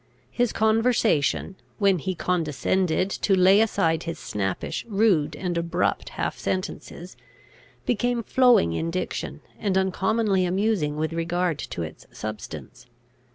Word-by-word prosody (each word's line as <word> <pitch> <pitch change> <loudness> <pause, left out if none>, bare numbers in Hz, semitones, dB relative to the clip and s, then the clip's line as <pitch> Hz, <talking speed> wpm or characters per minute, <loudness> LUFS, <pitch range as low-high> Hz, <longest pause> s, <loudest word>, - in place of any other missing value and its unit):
His 245 -2 +1
conversation, 220 - +2 0.2
when 195 -4 +3
he 185 +4 -3
condescended 180 +2 0
to 195 - +1
lay 190 +3 +6
aside 165 -7 +1
his 165 -1 -5
snappish, 95 -3 -3
rude, 195 -8 +2
and 175 +2 -3
abrupt 170 +1 -1
half - - -2
sentences, 185 -1 -4 0.7
became 245 0 0
flowing 245 - +4
in 165 - -2
diction, 180 +2 -4 0.2
and 195 -3 0
uncommonly 190 +1 +1
amusing 185 -4 0
with 160 +1 -1
regard 170 -1 -1
to 85 - -4
its 80 - -9
substance. 110 0 -8
185 Hz, 120 wpm, -25 LUFS, 165-210 Hz, 0.7 s, lay